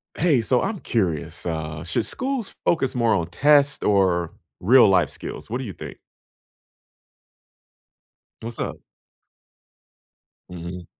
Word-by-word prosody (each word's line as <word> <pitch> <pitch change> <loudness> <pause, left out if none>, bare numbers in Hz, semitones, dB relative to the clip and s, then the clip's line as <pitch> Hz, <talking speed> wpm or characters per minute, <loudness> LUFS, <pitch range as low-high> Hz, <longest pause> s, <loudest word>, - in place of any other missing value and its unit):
Hey, 150 -7 +3
so 120 +3 +2
I'm 200 0 -2
curious, 90 - -2
uh, 75 -2 -4
should 85 - -1
schools 265 -4 -3
focus 135 -7 +1
more 115 -2 +2
on 85 -4 0
tests 145 - +3
or 90 -4 +2 0.3
real-life 95 -4 +5
skills? - - -8
What 120 +3 -2
do - - -4
you 105 -6 -6
think? - - -9 2.4
What's 115 +1 -7
up? - - -3 1.7
Mhm. 90 0 -8
105 Hz, 115 wpm, -23 LUFS, 85-135 Hz, 2.4 s, real-life